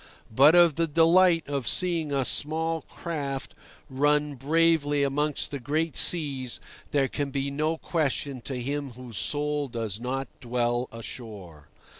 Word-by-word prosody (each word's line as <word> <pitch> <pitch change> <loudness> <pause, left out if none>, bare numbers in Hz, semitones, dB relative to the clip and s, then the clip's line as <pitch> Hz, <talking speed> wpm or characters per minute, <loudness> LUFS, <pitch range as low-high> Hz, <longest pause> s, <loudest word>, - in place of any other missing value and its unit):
But 145 +6 +7
of 170 -4 +5
the 165 0 +1
delight 165 +2 +4
of 140 -4 -3
seeing 170 -5 +1
a 135 -2 +1
small 160 +3 +1
craft 140 -5 -5 0.3
run 145 +2 +1
bravely 145 0 +2
amongst 145 +1 -1
the 140 - -4
great 155 +4 -1
seas 140 -7 0 0.3
there 140 -2 +1
can 145 +1 -3
be 140 0 -2
no 155 +3 -1
question 145 -5 -2
to 130 -3 -4
him 140 +1 -4
whose 120 -3 -6
soul 150 0 0
does 115 -4 -4
not 135 +3 -3
dwell 120 0 -1
ashore. 100 - -9
145 Hz, 140 wpm, -26 LUFS, 130-155 Hz, 0.3 s, But